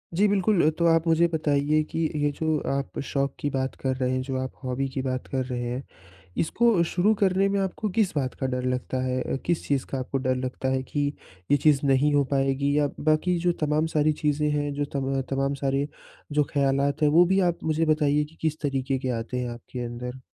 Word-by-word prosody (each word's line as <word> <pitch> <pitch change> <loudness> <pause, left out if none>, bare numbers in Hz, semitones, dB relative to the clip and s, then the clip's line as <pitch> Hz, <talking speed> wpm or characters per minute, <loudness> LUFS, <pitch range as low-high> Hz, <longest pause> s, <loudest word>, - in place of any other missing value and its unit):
जी, 205 +3 +4
बिल्कुल। 195 -4 +3
तो 170 - +3
आप 165 0 +3
मुझे 165 +1 +4
बताइए 150 -1 +1
कि 160 - -5 0.2
ये 145 0 +1
जो 155 +1 0
आप 140 0 -3
शौक 140 -1 -1
की 145 - -1
बात 130 -1 -2
कर 130 -1 0
रहे 130 -1 0
हैं, 130 0 0
जो 130 0 -3
आप 130 - -4
हॉबी 130 +2 -1
की 130 0 -3
बात 130 -1 -3
कर 130 -1 -1
रहे 125 -1 -3
हैं, 125 +3 -3 0.5
इसको 220 +1 +3
शुरू 185 +6 +2
करने 195 0 +3
में 200 0 0
आपको 195 +2 -2
किस 195 -8 +2
बात 130 -3 -1
का - - +1
डर 125 0 -2
लगता 130 0 -3
है? 130 0 -1
अ, - - -2
किस 170 -1 -1
चीज़ 140 -2 0
का 135 - -2
आपको 130 +1 -2
डर 130 -1 0
लगता 130 +1 -3
है 130 0 +1
कि 145 +1 -1 0.5
ये 145 - +6
चीज़ 145 -1 +4
नहीं 140 +2 +3
हो 145 -1 +4
पाएगी? 140 +1 +1
या 145 -1 +3
बाकी 155 +4 +2
जो - - +5
तमाम 150 +2 +1
सारी 155 +1 +4
चीज़ें 150 0 +1
हैं 145 -1 -1
जो 145 0 -1
तम 135 -1 -1
तमाम 135 +1 0
सारे 135 +1 +1 0.4
जो 150 0 +3
ख़यालात 140 +1 +1
है 150 - +5
वो 175 - +8
भी 190 +2 +2
आप 170 - -5
मुझे 160 +1 +1
बताइए 150 -1 +2
कि 155 +2 -12
किस 155 -1 -1
तरीके 135 -2 -1
के 130 - -3
आते 120 +2 -4
हैं 125 -1 -2
आपके 120 +1 -8
अंदर? 125 +2 -6
145 Hz, 225 wpm, -26 LUFS, 130-155 Hz, 0.5 s, वो